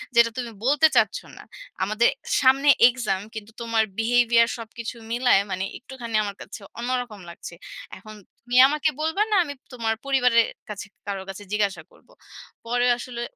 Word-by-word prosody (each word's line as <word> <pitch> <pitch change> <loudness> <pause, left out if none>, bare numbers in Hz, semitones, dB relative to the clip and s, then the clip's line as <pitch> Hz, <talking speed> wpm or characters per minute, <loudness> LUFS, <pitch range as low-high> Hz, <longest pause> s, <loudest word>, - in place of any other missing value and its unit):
যেটা 235 0 +6
তুমি 240 -2 -4
বলতে 295 +3 +5
চাচ্ছ - - +3 0.2
না। - - -11 0.4
আমাদের 215 +4 +2 0.3
সামনে 270 +2 +4 0.2
এক্সাম 235 -6 -1
কিন্তু 215 0 -8
তোমার 230 -1 +1 0.2
বিহেভিয়ার 235 0 +3
সবকিছু 230 +1 -7 0.2
মিলায় 240 -4 +4
মানে 185 +1 -2
একটুখানি 245 -3 -7
আমার 200 -1 -5
কাছে 205 +1 -9 0.2
অন্যরকম 245 -4 -3
লাগছে। 170 - -10 0.4
এখন 215 -1 -12 0.3
তুমি 245 +1 -1
আমাকে 300 +2 0
বলবা 320 +6 0
না - - +3
আমি 285 -3 -6 0.2
তোমার 225 -2 -1
পরিবারের 250 -4 +3 0.2
কাছে 205 0 -6 0.2
কারোর 195 -1 -4
কাছে 195 +2 -8
জিজ্ঞাসা 205 -2 -1
করবো?" - - -23 0.5
পরে 245 +1 +1
আসলে 240 -1 -7
235 Hz, 155 wpm, -24 LUFS, 215-255 Hz, 0.5 s, যেটা